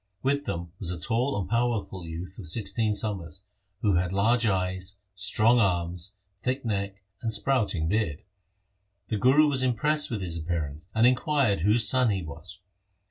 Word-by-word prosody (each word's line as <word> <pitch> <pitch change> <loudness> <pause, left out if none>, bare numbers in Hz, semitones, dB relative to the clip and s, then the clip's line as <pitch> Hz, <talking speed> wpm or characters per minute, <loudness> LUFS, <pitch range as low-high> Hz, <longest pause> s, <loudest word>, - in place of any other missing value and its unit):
With 140 +2 +1
them 85 - -4
was 90 - -3
a 90 -1 -3
tall 115 - 0
and 95 - -3
powerful 115 -6 -1
youth 85 +4 -7
of 95 - -7
sixteen 105 +3 0
summers, 95 -6 -4 0.4
who 100 -5 +3
had 90 +1 0
large 115 +4 +3
eyes, 95 0 -1 0.2
strong 105 +5 +3
arms, 90 -1 0 0.3
thick 130 +1 -2
neck, 100 -2 -2 0.2
and 115 - -1
sprouting 110 -11 +1
beard. 85 -6 0 0.9
The 110 - 0
Guru 135 +8 +5
was 135 -3 +1
impressed 145 +5 +1
with 110 -4 -3
his 85 -2 -3
appearance, 80 -1 -3
and 110 +1 +5
inquired 130 -3 +3
whose 105 +4 +3
son 130 +1 +3
he 95 -3 -1
was. 85 +4 -8
100 Hz, 160 wpm, -27 LUFS, 90-120 Hz, 0.9 s, Guru